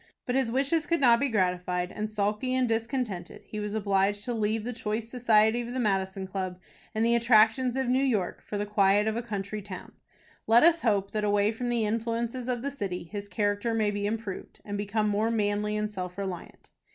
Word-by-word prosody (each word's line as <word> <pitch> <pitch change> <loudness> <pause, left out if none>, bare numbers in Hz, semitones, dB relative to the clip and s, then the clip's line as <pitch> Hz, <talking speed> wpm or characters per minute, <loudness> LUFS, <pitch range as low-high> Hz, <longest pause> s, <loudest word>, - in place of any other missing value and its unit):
But 250 - -1
his 260 -3 +1
wishes 280 +5 +1
could 335 - +2
not 240 -4 +5
be 280 - +1
gratified, 180 -3 0
and, 215 0 -4
sulky 215 +4 -1
and 255 -1 +2
discontented, 225 -5 -3
he 215 - -7
was 210 0 -3
obliged 200 0 +1
to 245 - -2
leave 220 -1 0
the 245 +2 -4
choice 220 0 -3
society 230 -1 +3
of 240 +1 -6
the - - -1
Madison 195 -3 0
Club, 185 -1 -4 0.4
and 220 +1 +2
the 235 - +3
attractions 235 +2 +4
of 265 -1 0
New 255 +2 +3
York, 220 -10 0
for 205 - -5
the 205 - -1
quiet 205 0 +3
of 220 0 0
a 235 - -1
country 210 -2 -4
town. 200 - -9 0.6
Let 230 +2 +6
us 335 0 +5
hope 200 -4 +1
that, 215 -1 -2
away 205 0 +3
from 240 +2 -4
the 235 -2 +1
influences 230 +3 -2
of 245 -1 -2
the 280 - -2
city, 195 -10 -4
his 200 +4 -7
character 205 +2 0
may 215 -2 +2
be 205 0 -2
improved, 215 -3 -5
and 205 - -4
become 210 +1 0
more 210 +2 +1
manly 210 -1 0
and 210 0 -2
self 180 -2 -5
reliant. 190 -3 -6
215 Hz, 210 wpm, -28 LUFS, 205-235 Hz, 0.6 s, Let